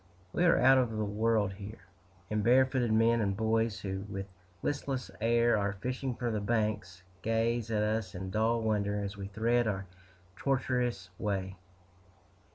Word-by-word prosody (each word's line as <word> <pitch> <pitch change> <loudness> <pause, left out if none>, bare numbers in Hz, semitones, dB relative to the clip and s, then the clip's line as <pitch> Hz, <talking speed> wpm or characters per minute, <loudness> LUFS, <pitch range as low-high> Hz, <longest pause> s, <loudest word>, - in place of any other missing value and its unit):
We 180 - +2
are 170 - +5
out 130 +1 +6
of 115 -4 0
the 110 - 0
world, 105 -1 +1
here; 100 -1 -10 0.5
and 105 -1 0
barefooted 130 0 +3
men 115 +1 +4
and 100 -2 0
boys, 110 -2 +1
who 95 -1 -3
with 95 -1 -4 0.4
listless 135 -7 -2
air 115 +1 +3
are 100 -1 0
fishing 125 +4 -3
from 120 -2 -2
the 105 - -1
banks, 105 -4 -1 0.2
gaze 115 +1 0
at 105 -1 +1
us 105 -3 -1
in 95 +1 -5
dull 115 +2 +1
wonder 105 -2 0
as 100 +1 -4
we 100 -1 -6
thread 115 +3 +1
our 100 -2 -2 0.5
tortuous 125 -5 -1
way. 95 -2 -2
110 Hz, 160 wpm, -31 LUFS, 100-120 Hz, 0.5 s, out